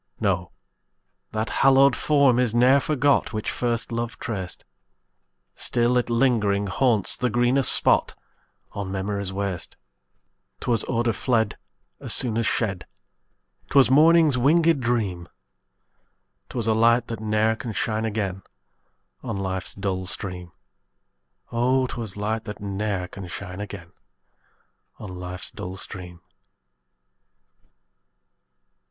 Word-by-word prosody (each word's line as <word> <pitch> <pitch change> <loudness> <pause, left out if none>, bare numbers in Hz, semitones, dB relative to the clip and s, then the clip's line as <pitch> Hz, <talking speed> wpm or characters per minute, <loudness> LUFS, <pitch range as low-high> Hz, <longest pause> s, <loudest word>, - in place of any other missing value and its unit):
No, - - -1 0.8
that 110 +1 -3
hallowed 135 -1 +5
form 140 -5 +3
is 120 -3 0
ne'er 130 +3 +5
forgot 140 -3 +1
Which 110 -1 -2
first 120 -1 -2
love 115 0 -4
traced; 95 -7 -6 0.9
Still 120 +1 +2
it 125 -1 0
lingering 115 -5 +1
haunts 110 +1 +2
the 125 - -1
greenest 120 +4 +4
spot - - +4 0.6
On 100 -2 -5
memory's 100 0 -3
waste. 95 -2 -4 0.8
'Twas 115 -3 0
odor 115 -1 0
fled 110 -4 0 0.4
As - - +4
soon 120 -4 +1
as 115 - 0
shed; 100 -6 -2 0.8
'Twas 135 -2 +4
morning's 155 -1 +5
winged 160 +2 +3
dream; 105 -8 -2 1.2
'Twas 120 -3 -3
a 110 - +2
light, 115 +2 +3
that 115 -2 -5
ne'er 110 +1 +1
can 115 0 -6
shine 110 +1 -2
again 100 -4 -3 0.8
On 115 -5 -4
life's 95 -1 -3
dull 95 -2 -3
stream: 90 -2 -3 1.0
Oh! 130 +2 +1
'twas 115 -5 -6
light 110 +2 -3
that 105 -2 -7
ne'er 100 -2 -3
can 95 0 -9
shine 95 +2 -7
again 95 -5 -9 1.1
On 105 - -9
life's 90 0 -6
dull 90 +1 -7
stream. 90 -3 -7
110 Hz, 115 wpm, -24 LUFS, 100-125 Hz, 1.2 s, hallowed